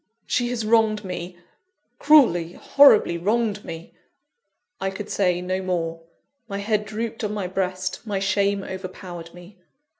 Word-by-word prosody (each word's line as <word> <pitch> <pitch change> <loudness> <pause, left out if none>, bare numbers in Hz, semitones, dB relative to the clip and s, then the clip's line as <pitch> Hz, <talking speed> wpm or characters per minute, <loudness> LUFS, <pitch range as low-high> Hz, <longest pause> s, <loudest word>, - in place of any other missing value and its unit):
"She 245 -1 0
has 235 -3 -3
wronged 215 -2 +2
me 180 -1 -6 0.6
cruelly, 180 - +5
horribly, 215 -11 +5
wronged 210 +2 0
me 165 0 -9 0.5
" 480 - -45
I 195 - 0
could 200 +2 -7
say 180 -3 +1
no 185 +1 -2
more. 165 -3 -2 0.5
My 200 - -4
head 210 +1 -1
drooped 225 +2 -5
on 210 0 -2
my 200 -3 -3
breast; 185 0 -2
my 210 -4 -3
shame 200 0 +1
overpowered 185 -2 -8
me. 180 +2 -14
195 Hz, 145 wpm, -23 LUFS, 180-215 Hz, 0.6 s, cruelly